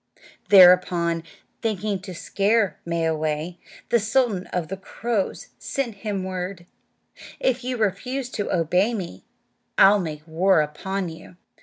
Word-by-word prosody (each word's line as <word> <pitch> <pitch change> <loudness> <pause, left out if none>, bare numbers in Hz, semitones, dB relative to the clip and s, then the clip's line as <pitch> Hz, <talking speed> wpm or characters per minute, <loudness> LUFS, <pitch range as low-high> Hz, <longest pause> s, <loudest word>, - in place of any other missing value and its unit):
Thereupon, 180 -3 +6 0.4
thinking 210 -2 -1
to 185 -2 -8
scare 205 +3 +1
Mwayway, 160 0 -1 0.3
the 235 - +4
sultan 220 -3 0
of 175 -3 -3
the 195 - -4
crows 210 +1 -3
sent 240 -6 -3
him 200 -2 -3
word, 185 -1 -5 0.7
"If 255 -1 0
you 250 0 -2
refuse 240 +5 -1
to 205 - -3
obey 180 +7 +2
me 175 - -7 0.5
I'll 205 +1 +7
make 155 -3 -6
war 175 +2 +3
upon 185 +5 -3
you." 165 +2 -12
190 Hz, 125 wpm, -23 LUFS, 170-210 Hz, 0.7 s, I'll